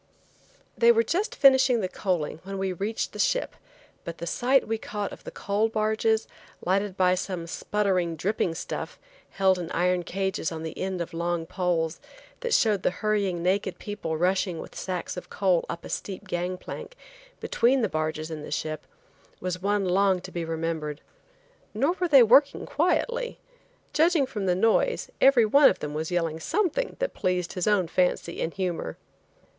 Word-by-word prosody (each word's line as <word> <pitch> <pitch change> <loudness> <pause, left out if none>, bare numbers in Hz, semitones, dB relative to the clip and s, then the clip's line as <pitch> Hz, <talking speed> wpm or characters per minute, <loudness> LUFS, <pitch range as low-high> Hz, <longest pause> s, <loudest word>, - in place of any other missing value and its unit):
They 235 0 +6
were 230 0 +3
just 375 - -1
finishing 265 -3 +5
the 185 - 0
coaling 175 -5 -2
when 195 +1 -6
we 190 -1 -1
reached 205 +5 -3
the - - -8
ship, - - +1 0.5
but 170 -1 -6
the - - -5
sight 250 +9 +2
we 225 0 -1
caught 205 -2 -4
of - - -12
the - - -5
coal 205 +3 0
barges, 220 0 +1 0.4
lighted 195 +1 0
by 180 -1 +4
some 185 -2 -3
sputtering, 185 -1 0
dripping 175 0 -1
stuff, - - -5 0.3
held 190 -1 +2
in 170 -2 -5
iron 180 +1 +1
cages 190 -1 -2
on 160 -1 -5
the 160 - -5
end 185 -1 -3
of 170 +1 -5
long 170 0 -1
poles, 170 -2 -1 0.4
that 480 -1 -3
showed 210 -4 +3
the - - +2
hurrying 195 -2 -1
naked 190 +1 0
people 205 -6 -4
rushing 180 +1 +1
with - - -8
sacks 185 -1 -4
of 180 - -7
coal 185 -4 +1
up 170 - -5
a - - -8
steep 200 +1 -5
gangplank, 180 - -4 0.4
between 250 +2 +2
the - - +3
barges 155 0 -3
and 155 -2 -6
the - - -8
ship, 155 +1 -4 0.5
was 180 0 -3
one 205 0 +1
long 190 +1 +3
to 185 - -9
be 170 -2 -3
remembered. 160 -2 -3 0.8
Nor 285 +5 +2
were 360 - +1
they 275 -6 +8
working 270 +5 +4
quietly. 475 - 0 0.6
Judging 320 -2 +4
from 210 -7 -4
the 180 - +3
noise, 225 - +1
every 265 -4 +6
one 280 +6 +7
of - - -1
them 150 0 -5
was 155 +1 -3
yelling 165 -3 -1
something 415 - -1
that - - -2
pleased 180 -1 -1
his 180 +1 -2
own 205 -4 +3
fancy 180 0 0
and 165 - -1
humor. 175 - -3
190 Hz, 175 wpm, -26 LUFS, 170-220 Hz, 0.8 s, they